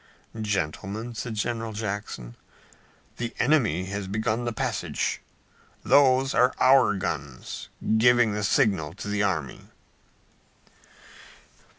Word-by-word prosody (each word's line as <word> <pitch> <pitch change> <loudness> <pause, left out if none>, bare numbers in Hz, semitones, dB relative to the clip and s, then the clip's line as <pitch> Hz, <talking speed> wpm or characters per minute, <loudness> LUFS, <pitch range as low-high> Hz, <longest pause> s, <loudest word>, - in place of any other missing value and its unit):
"Gentlemen," 105 +3 -3
said 115 0 -5
General 115 +1 -2
Jackson, 100 - -5 0.8
"the 120 -1 -4
enemy 120 - +2
has 100 0 -4
begun 110 +4 -1
the 120 - -1
passage. 110 - -2 0.6
Those 135 -1 +4
are 125 +1 +3
our 130 -5 +5
guns 75 -9 -5 0.3
giving 120 -2 +4
the 105 0 -2
signal 95 - +1
to 105 - -7
the 105 0 0
army." 80 -10 -2
105 Hz, 100 wpm, -26 LUFS, 95-120 Hz, 0.8 s, our